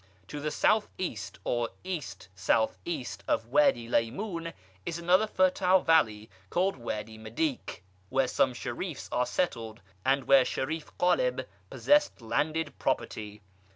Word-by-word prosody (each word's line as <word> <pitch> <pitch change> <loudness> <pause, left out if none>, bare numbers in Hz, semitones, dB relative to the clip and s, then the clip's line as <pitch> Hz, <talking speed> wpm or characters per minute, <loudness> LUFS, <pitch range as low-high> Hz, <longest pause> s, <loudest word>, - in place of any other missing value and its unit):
To 150 - -5
the 155 +1 -2
South 215 +7 +2
east 120 - -4
or 120 -1 0
East 145 - -5
south 95 +4 +1
east 125 -12 -4
of 110 - +1
Wady 120 -4 +3
Lymoun 165 - -1 0.3
is 165 - -3
another 180 +5 +3
fertile 185 -1 +3
valley, 110 -10 +3 0.2
called 190 +2 +1
Wady 110 -2 -5
Medyk, 275 - -3 0.3
where 130 0 +2
some 130 0 +2
sherifs 140 +7 -5
are 125 0 +1
settled, 115 - -2 0.2
and 135 +1 +2
where 135 0 +6
Sherif 155 +5 -3
Ghaleb - - +2 0.2
possessed 295 0 +3
landed 150 +7 -1
property. 105 -1 -2
140 Hz, 130 wpm, -29 LUFS, 115-180 Hz, 0.3 s, where